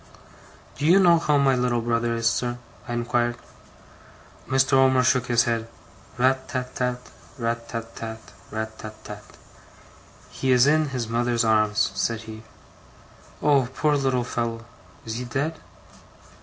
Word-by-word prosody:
'Do 145 - -1
you 180 +4 +7
know 170 -3 +6
how 150 -3 +2
my 140 -1 +4
little 125 -1 +1
brother 115 0 0
is, 115 0 0
sir?' 120 +1 0 0.3
I 120 - -4
inquired. 120 0 0 1.1
Mr. 135 +1 +2
Omer 130 -1 +5
shook 125 0 +2
his 120 -1 +3
head. 115 -1 -1 0.5
'RAT 130 +1 +2
tat 125 -1 -4
tat, 125 0 -3 0.3
RAT 115 -1 -3
tat 115 -1 -6
tat, 110 -1 -8 0.2
RAT 110 0 -5
tat 110 0 -8
tat.' 105 0 -11 0.9
'He 130 - -1
is 125 0 +6
in 155 +1 +3
his 125 -4 -3
mother's 120 0 0
arms,' 110 -1 +2
said 115 -1 -1
he. 110 -1 -9 1.0
'Oh, 140 -4 +3
poor 150 -1 +2
little 135 -3 +1
fellow! 115 -1 -3 0.4
Is 110 0 -4
he 125 - -4
dead? 145 +6 -2
120 Hz, 145 wpm, -24 LUFS, 115-130 Hz, 1.1 s, you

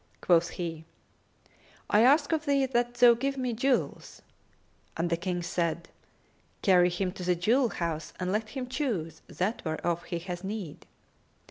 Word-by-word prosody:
Quoth 170 -1 +3
he, 165 -3 -4 1.0
"I 210 - +4
ask 285 +5 +4
of 315 -1 0
thee 280 -1 +3
that 240 -2 0
thou 240 0 +7
give 275 +4 -2
me 250 -2 -1
jewels;" 255 +3 -1 0.7
and 170 +1 -1
the - - +3
King 175 +1 -3
said, 170 -1 -2 0.7
"Carry 180 -2 +5
him 180 +1 -2
to 180 - -8
the 180 0 +2
jewel 235 +9 +2
house 165 -5 -3
and 180 0 -1
let 215 +2 -1
him 265 -3 -4
choose 245 - -3
that 200 +6 -2
whereof 165 +1 -2
he 170 - -3
hath 175 +1 -6
need." 195 -6 -6
190 Hz, 155 wpm, -28 LUFS, 170-245 Hz, 1.0 s, thou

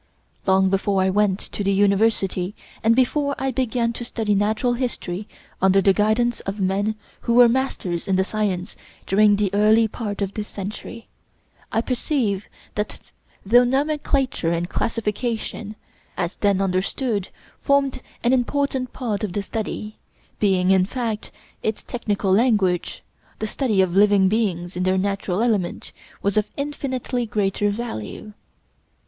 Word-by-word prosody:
Long 190 0 +4
before 195 0 +1
I 190 0 +2
went 200 -1 +2
to 205 - -4
the 200 - +2
university, 200 -1 +2 0.3
and 225 +1 +5
before 280 +3 +2
I 265 0 -1
began 240 -2 0
to 240 - -5
study 225 -3 -1
natural 215 +5 +1
history 215 -6 -3 0.3
under 190 +1 +5
the 195 0 +4
guidance 220 +4 +2
of 195 +2 -5
men 200 +3 0 0.2
who 235 - 0
were 245 0 +8
masters 230 -8 -1
in 190 - +2
the 190 - +3
science 200 -2 -2 0.3
during 205 +1 +4
the 200 -2 0
early 215 +2 +5
part 210 -2 -4
of 195 0 -4
this 210 -1 -4
century, 210 +3 -7 0.6
I 225 - +2
perceived 235 -5 -1 0.3
that 210 0 -3 0.5
though 240 +5 +6
nomenclature 270 - 0
and 170 +1 -1
classification, 220 0 -2 0.4
as 170 +2 -2
then 200 -2 +2
understood, 195 +3 -1 0.3
formed 280 -2 +1 0.2
an 240 +2 +3
important 260 0 0
part 225 -5 -3
of 200 -4 -2
the 205 - -2
study, 215 0 -5 0.4
being, 190 -2 +3
in 190 -1 +4
fact, 225 -2 -3 0.3
its 215 -1 -2
technical 205 -5 -1
language, 200 -5 +2 0.3
the 220 - -3
study 215 -3 +1
of 185 -1 0
living 200 -1 +5
beings 185 -5 -1
in 180 - -2
their 185 +1 +2
natural 195 +1 -1
element 210 -7 -1 0.3
was 200 +1 +1
of 215 - +1
infinitely 260 -4 -2
greater 205 -1 0
value. 210 - -5
210 Hz, 145 wpm, -22 LUFS, 195-240 Hz, 0.6 s, were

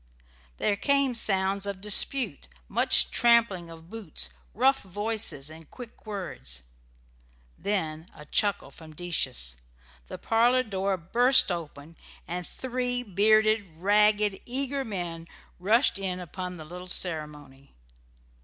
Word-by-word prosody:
There 205 - +1
came 275 +1 +2
sounds 195 -3 +2
of 200 -2 -4
dispute, 210 - 0 0.2
much - - +3
tramping 230 -8 +3
of 165 +1 -13
boots, 220 -8 -4 0.3
rough 265 +5 +3
voices, 205 -7 -2
and 160 -1 -13
quick 240 -2 -12
words; 65 - -3 0.9
then 165 -5 -2
a 150 - -12
chuckle 205 +5 0
from 155 -1 -13
Decius, 60 - -2 0.5
the - - -7
parlour 240 +3 +3
door 195 -3 -1
burst 240 +7 +4
open, 165 -2 -6 0.3
and 175 0 -4
three 250 -1 -2
bearded, 215 0 +3
ragged, 210 +2 +3
eager 275 +2 -1
men 175 -7 -5 0.3
rushed 215 +4 +3
in 185 -2 -3
upon 180 +1 -6
the 155 - -9
little 180 +3 -9
ceremony. 150 -6 -2
195 Hz, 115 wpm, -27 LUFS, 165-225 Hz, 0.9 s, burst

